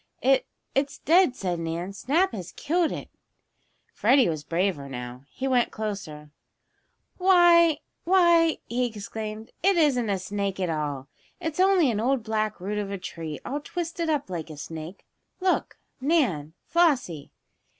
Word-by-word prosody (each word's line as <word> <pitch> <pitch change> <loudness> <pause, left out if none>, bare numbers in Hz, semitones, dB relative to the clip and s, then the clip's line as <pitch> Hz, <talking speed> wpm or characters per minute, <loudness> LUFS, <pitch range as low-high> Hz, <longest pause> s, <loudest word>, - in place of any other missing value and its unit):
"It 265 0 +3 0.3
it's 275 +1 0
dead," 340 -4 +4
said 180 -7 -2
Nan. 165 +3 -4
"Snap 305 - +1
has 185 -6 -7
killed 335 +2 0
it." - - -6 0.9
Freddie 250 +1 +4
was 155 -3 -3
braver 165 -4 -1
now. 125 0 -7
He 265 - -4
went 250 -2 +2
closer. 175 -9 -6 0.9
"Why 345 -4 +5 0.2
why!" 340 -3 +4
he 245 +1 0
exclaimed. 220 +1 -7
"It 390 0 +3
isn't 260 -8 +3
a 195 - +1
snake 195 +1 -3
at 180 -3 0
all! 145 -4 -3 0.3
It's 325 -2 -4
only 370 -7 +4
an 210 - -2
old 250 +1 +1
black 215 -1 -1
root 205 +3 -3
of 205 -1 -3
a 200 - -3
tree, 165 -4 -6
all 285 +3 -2
twisted 335 +1 -4
up 295 -3 0
like 170 -4 -5
a 155 - -9
snake! 160 +4 -8 0.3
Look, 370 -1 0 0.2
Nan 240 - +1
Flossie!" 265 - +1
220 Hz, 150 wpm, -26 LUFS, -, 0.9 s, Why